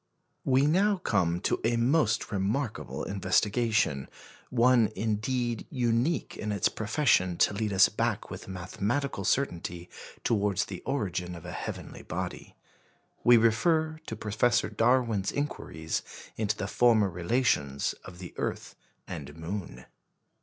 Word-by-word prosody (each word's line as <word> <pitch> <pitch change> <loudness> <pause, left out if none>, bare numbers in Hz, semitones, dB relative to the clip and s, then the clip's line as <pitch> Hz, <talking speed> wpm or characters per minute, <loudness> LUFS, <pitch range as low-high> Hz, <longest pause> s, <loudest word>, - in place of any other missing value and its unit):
We 135 +1 +3
now 195 +7 +3
come 90 - +1
to - - 0
a 115 +1 +2
most 125 -2 +2
remarkable 105 +5 -2
investigation 100 - +1 0.4
one, 120 -2 +4
indeed, 115 +3 -1
unique 120 +5 0
in 105 - -3
its 100 -3 +2
profession 110 - +1
to - - +3
lead 105 +1 -1
us 95 -1 +6
back - - -2
with - - -8
mathematical 100 +6 -2
certainty 90 -8 -1 0.3
towards 105 -3 +1
the 95 - -7
origin 90 -9 -2
of 85 0 -10
a 90 - -6
heavenly - - -6
body. - - -5 0.7
We 120 0 +7
refer 155 +8 +2
to 110 - -4
Professor 110 +2 +1
Darwin's 115 -2 +2
inquiries 80 - -3 0.3
into 105 -1 -1
the 95 - -2
former 110 -1 +4
relations 85 - 0
of 90 -1 -11
the 90 -1 -9
earth - - -3 0.3
and 75 -4 -7
moon. 80 -6 -6
105 Hz, 125 wpm, -29 LUFS, 95-120 Hz, 0.7 s, We